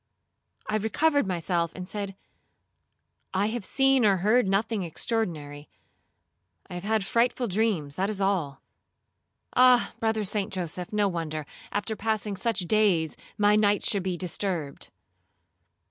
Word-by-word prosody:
I 215 Hz, 0 st, +1 dB
recovered 285 Hz, +5 st, +1 dB
myself, 170 Hz, -2 st, -1 dB
and 180 Hz, -1 st, -6 dB
said, 200 Hz, -1 st, -5 dB, 1.2 s
'I 195 Hz, +2 st, +2 dB
have 235 Hz, -1 st, -3 dB
seen 270 Hz, +4 st, +3 dB
or 200 Hz, -3 st, +4 dB
heard 215 Hz, +5 st, +3 dB
nothing 205 Hz, +2 st, 0 dB
extraordinary. 160 Hz, -6 st, -3 dB, 1.0 s
I -, -, -10 dB
have 175 Hz, 0 st, -5 dB
had 215 Hz, -1 st, 0 dB
frightful 240 Hz, +3 st, +1 dB
dreams, 190 Hz, -8 st, 0 dB
that 195 Hz, +2 st, 0 dB
is 210 Hz, -2 st, -2 dB
all. 180 Hz, -9 st, -1 dB, 0.9 s
Ah! 250 Hz, -1 st, +5 dB
Brother 220 Hz, -1 st, 0 dB
St. 205 Hz, +1 st, -2 dB
Joseph, 180 Hz, -1 st, -4 dB
no 210 Hz, -1 st, +2 dB
wonder, 160 Hz, -4 st, -3 dB, 0.3 s
after 205 Hz, +2 st, -2 dB
passing 215 Hz, -1 st, -2 dB
such 205 Hz, +1 st, -1 dB
days, 180 Hz, -5 st, +2 dB, 0.2 s
my 205 Hz, 0 st, +4 dB
nights 205 Hz, -1 st, +3 dB
should 200 Hz, -, +1 dB
be 185 Hz, -1 st, -2 dB
disturbed.' 175 Hz, -4 st, -2 dB
200 Hz, 130 wpm, -27 LUFS, 180-220 Hz, 1.2 s, Ah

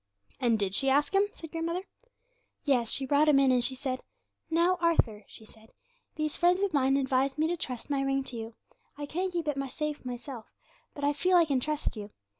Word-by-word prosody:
"' 100 Hz, -, -36 dB
'And 235 Hz, -3 st, +3 dB
did 200 Hz, -2 st, -1 dB
she 270 Hz, +6 st, +3 dB
ask 290 Hz, +6 st, +2 dB
him?' 395 Hz, +1 st, +4 dB
said 325 Hz, -2 st, -11 dB
grandmother. 335 Hz, +2 st, -2 dB, 0.8 s
'Yes, 245 Hz, -6 st, +2 dB
she 270 Hz, -, -1 dB
brought 290 Hz, +3 st, +3 dB
him 290 Hz, -, +6 dB
in, 270 Hz, -1 st, +5 dB
and 250 Hz, -1 st, +3 dB
she 260 Hz, +2 st, +3 dB
said: 260 Hz, -1 st, -3 dB, 0.5 s
"Now, 340 Hz, +3 st, +2 dB
Arthur," 235 Hz, -11 st, +1 dB
she 220 Hz, -, -14 dB
said, 220 Hz, +1 st, -18 dB, 0.4 s
"these 305 Hz, -1 st, -2 dB
friends 360 Hz, +3 st, +3 dB
of 395 Hz, -4 st, 0 dB
mine 270 Hz, -1 st, +3 dB
advise 270 Hz, 0 st, +1 dB
me 310 Hz, -, +2 dB
to 350 Hz, -, 0 dB
trust 260 Hz, -5 st, -5 dB
my 275 Hz, -1 st, +1 dB
ring 270 Hz, 0 st, 0 dB
to 255 Hz, -, -9 dB
you. 225 Hz, 0 st, -6 dB, 0.4 s
I 290 Hz, -, -4 dB
can't 360 Hz, +6 st, -2 dB
keep 340 Hz, -3 st, -3 dB
it 275 Hz, -3 st, -2 dB
safe 300 Hz, +1 st, -4 dB
myself, 245 Hz, -1 st, -7 dB, 0.4 s
but 285 Hz, -, -7 dB
I 290 Hz, +1 st, +3 dB
feel 360 Hz, +5 st, +3 dB
I 340 Hz, -, +5 dB
can 280 Hz, -4 st, +1 dB
trust 300 Hz, +1 st, -2 dB
you. 210 Hz, -1 st, -7 dB
275 Hz, 220 wpm, -29 LUFS, 255-320 Hz, 0.8 s, him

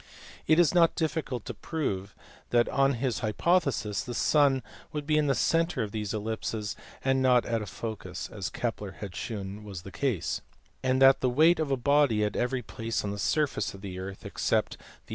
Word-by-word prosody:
It 155 Hz, -, +5 dB
is 175 Hz, -2 st, +5 dB
not 170 Hz, -2 st, +4 dB
difficult 155 Hz, -7 st, -2 dB
to -, -, -5 dB
prove 100 Hz, -, -3 dB, 0.3 s
that 120 Hz, -1 st, +3 dB
on 135 Hz, 0 st, +3 dB
his 125 Hz, 0 st, -1 dB
hypotheses 120 Hz, -, +1 dB
the 120 Hz, -, -6 dB
sun 140 Hz, -3 st, +3 dB, 0.3 s
would 150 Hz, -1 st, -4 dB
be 155 Hz, 0 st, +2 dB
in 150 Hz, -1 st, +3 dB
the 135 Hz, -, +2 dB
centre 165 Hz, -6 st, +1 dB
of 105 Hz, -, -5 dB
these 105 Hz, -2 st, -3 dB
ellipses 110 Hz, 0 st, -3 dB, 0.3 s
and 135 Hz, 0 st, +3 dB
not 125 Hz, -2 st, +4 dB
at 115 Hz, -1 st, -1 dB
a 105 Hz, -, -5 dB
focus 95 Hz, -5 st, -6 dB
(as 95 Hz, -6 st, -5 dB
Kepler 105 Hz, -1 st, -3 dB
had 95 Hz, -2 st, -8 dB
shewn 105 Hz, -2 st, -5 dB
was 95 Hz, -4 st, -8 dB
the 100 Hz, -, -9 dB
case), 115 Hz, -, -1 dB, 0.4 s
and 130 Hz, 0 st, +1 dB
that 135 Hz, 0 st, +7 dB
the 130 Hz, -, +2 dB
weight 160 Hz, +7 st, +5 dB
of 155 Hz, -3 st, 0 dB
a 135 Hz, -, +1 dB
body 135 Hz, -4 st, +3 dB
at 105 Hz, -, -1 dB
every 125 Hz, 0 st, 0 dB
place 115 Hz, +1 st, -3 dB
on 100 Hz, -, -2 dB
the 100 Hz, -, -5 dB
surface 140 Hz, +1 st, 0 dB
of 95 Hz, -, -12 dB
the 95 Hz, -2 st, -6 dB
earth 95 Hz, +1 st, -7 dB
except -, -, 0 dB
the -, -, -8 dB
CAVALIERI. -, -, -21 dB
120 Hz, 200 wpm, -28 LUFS, 105-140 Hz, 0.4 s, that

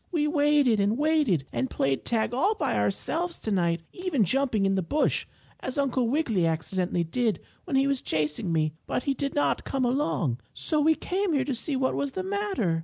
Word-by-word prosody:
We 305 Hz, -4 st, +1 dB
waited 290 Hz, -6 st, +3 dB
and 205 Hz, +3 st, +2 dB
waited, 290 Hz, -, +2 dB
and 260 Hz, -, -1 dB
played 135 Hz, 0 st, -1 dB
tag 230 Hz, 0 st, 0 dB
all 385 Hz, -, +2 dB
by -, -, -1 dB
ourselves 320 Hz, -, -1 dB
tonight, 170 Hz, -5 st, 0 dB
even 360 Hz, -, 0 dB
jumping 235 Hz, -1 st, +1 dB
in 195 Hz, -, +2 dB
the 190 Hz, -, +1 dB
bush, 290 Hz, -, 0 dB, 0.3 s
as 260 Hz, -, -5 dB
Uncle 260 Hz, -3 st, +1 dB
Wiggily 230 Hz, -, +1 dB
accidentally 175 Hz, +2 st, -1 dB
did 220 Hz, +6 st, 0 dB, 0.3 s
when 325 Hz, -7 st, -2 dB
he 270 Hz, +1 st, +4 dB
was 275 Hz, -2 st, 0 dB
chasing 155 Hz, +3 st, -1 dB
me, 155 Hz, -2 st, +1 dB
but 250 Hz, -, -1 dB
he 275 Hz, -, +1 dB
did 275 Hz, +1 st, -3 dB
not 290 Hz, -, +1 dB
come 270 Hz, -2 st, -1 dB
along. 165 Hz, -, 0 dB, 0.2 s
So 305 Hz, -2 st, +1 dB
we 315 Hz, +2 st, +4 dB
came 375 Hz, +1 st, -1 dB
here 275 Hz, -, +1 dB
to 280 Hz, -, -1 dB
see 270 Hz, +4 st, -2 dB
what 260 Hz, 0 st, +1 dB
is 280 Hz, -1 st, -3 dB
the 375 Hz, -, -3 dB
matter." 385 Hz, -, -1 dB
255 Hz, 195 wpm, -27 LUFS, 180-295 Hz, 0.3 s, he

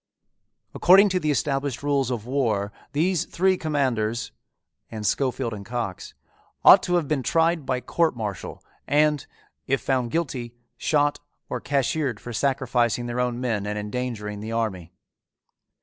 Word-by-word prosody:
"According 195 Hz, +3 st, +6 dB
to 185 Hz, -1 st, +1 dB
the 155 Hz, -, -1 dB
established 140 Hz, -2 st, -1 dB
rules 140 Hz, -3 st, +1 dB
of 120 Hz, -4 st, -3 dB
war 115 Hz, -6 st, 0 dB, 0.2 s
these 170 Hz, +3 st, +1 dB
three 190 Hz, +2 st, +2 dB
commanders" 125 Hz, -9 st, -1 dB, 0.6 s
and 110 Hz, -2 st, -6 dB
Schofield 130 Hz, -1 st, 0 dB
and 100 Hz, -1 st, -7 dB
Cox 110 Hz, -4 st, -5 dB, 0.5 s
"ought -, -, +10 dB
to 180 Hz, -, 0 dB
have 170 Hz, -4 st, +1 dB
been 150 Hz, -2 st, 0 dB
tried 165 Hz, +1 st, +1 dB
by 125 Hz, -1 st, 0 dB
court 165 Hz, +1 st, +1 dB
martial 105 Hz, -5 st, -5 dB, 0.2 s
and, 150 Hz, 0 st, +2 dB, 0.4 s
if 135 Hz, 0 st, +1 dB
found 130 Hz, -3 st, 0 dB
guilty, 125 Hz, -6 st, -3 dB, 0.2 s
shot 145 Hz, -1 st, +1 dB, 0.3 s
or -, -, -3 dB
cashiered 140 Hz, -3 st, 0 dB
for 120 Hz, -, -8 dB
sacrificing 125 Hz, -2 st, +1 dB
their 120 Hz, +1 st, -3 dB
own 125 Hz, -1 st, 0 dB
men 110 Hz, -5 st, -1 dB
and 105 Hz, 0 st, -3 dB
endangering 105 Hz, -1 st, -4 dB
the 110 Hz, +2 st, -6 dB
army." 95 Hz, -7 st, -2 dB
125 Hz, 145 wpm, -24 LUFS, 115-145 Hz, 0.6 s, ought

